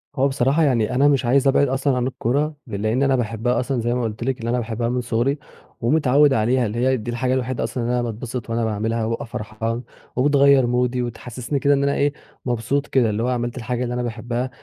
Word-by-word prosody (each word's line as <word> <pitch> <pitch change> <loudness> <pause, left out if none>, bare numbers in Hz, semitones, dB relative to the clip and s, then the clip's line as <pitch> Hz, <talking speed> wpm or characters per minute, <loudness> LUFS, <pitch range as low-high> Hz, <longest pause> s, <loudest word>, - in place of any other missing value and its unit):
هو 135 +1 +3
بصراحة 135 +4 +2
يعني 125 -4 +1
أنا 140 +2 +4
مش 140 -3 +2
عايز 135 +3 +3
أبعِد 135 +1 +4
أصلًا 135 0 0
عن 125 0 0
الكورة، 145 +5 -1
لإن 110 +5 0
أنا 135 -1 +3
باحبها 115 +1 0
أصلًا 125 -1 -1
زي 120 +1 0
ما 125 -1 -1
قلت 110 +1 -4
لِك 130 -2 -2
إن 115 - -4
أنا 120 +1 +1
باحبها 115 0 -2
من 125 0 0
صغري، 120 +4 0 0.4
ومتعود 140 +2 +4
عليها 120 +2 +2
اللي 110 +3 -3
هي 130 +1 +2
دي 120 +1 -5
الحاجة 125 +2 0
الوحيدة 130 -1 -1
أصلًا 125 - -3
اللي 120 +1 0
أنا 125 - +1
باتبسط 120 +1 -5
وأنا 115 0 0
باعملها 110 +1 -1
وبابقي 115 +1 -2
فرحان، 115 +2 -4 0.3
وبتغيّر 140 -1 +4
مودي 125 0 +1
وتحسسني 120 +3 -4
كده 145 +1 +3
إن 140 0 +1
أنا 140 0 +1
إيه 145 0 +1 0.3
مبسوط 125 +4 -1
كده 125 -5 +2
اللي 105 +2 -1
هو - - 0
عملت 120 0 -2
الحاجة 125 +1 -2
اللي 120 0 -3
أنا 125 - -2
باحبها، 120 +2 -3
125 Hz, 220 wpm, -22 LUFS, 115-135 Hz, 0.4 s, أنا